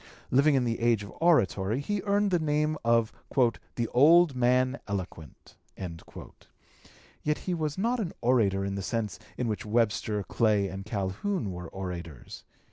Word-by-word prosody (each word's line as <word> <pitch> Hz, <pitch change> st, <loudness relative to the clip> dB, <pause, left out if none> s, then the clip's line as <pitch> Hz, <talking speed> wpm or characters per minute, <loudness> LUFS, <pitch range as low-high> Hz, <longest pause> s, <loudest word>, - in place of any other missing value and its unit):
Living 140 Hz, +3 st, +4 dB
in 130 Hz, -, +2 dB
the 115 Hz, -1 st, -1 dB
age 115 Hz, -3 st, +2 dB
of 100 Hz, -, -10 dB
oratory, 115 Hz, -, +2 dB
he 200 Hz, +7 st, -2 dB
earned 200 Hz, 0 st, +2 dB
the 175 Hz, -, +3 dB
name 150 Hz, 0 st, 0 dB
of 115 Hz, -1 st, +2 dB, 0.6 s
"the 120 Hz, -1 st, -1 dB
old 155 Hz, +3 st, +5 dB
man 125 Hz, +2 st, +2 dB
eloquent." 90 Hz, -8 st, -7 dB, 1.6 s
Yet 150 Hz, 0 st, 0 dB
he 185 Hz, -, -2 dB
was 155 Hz, -2 st, -2 dB
not 235 Hz, +5 st, 0 dB
an 195 Hz, -7 st, -2 dB
orator 105 Hz, -6 st, +2 dB
in 100 Hz, -, -3 dB
the 100 Hz, -, -3 dB
sense 105 Hz, -3 st, -3 dB, 0.2 s
in 125 Hz, -, -1 dB
which 110 Hz, +1 st, -2 dB
Webster, 105 Hz, -1 st, 0 dB
Clay, 105 Hz, -1 st, +1 dB
and 95 Hz, +1 st, -7 dB
Calhoun 105 Hz, -, -2 dB
were 90 Hz, -2 st, -7 dB
orators. 85 Hz, -7 st, -7 dB
115 Hz, 150 wpm, -28 LUFS, 100-150 Hz, 1.6 s, old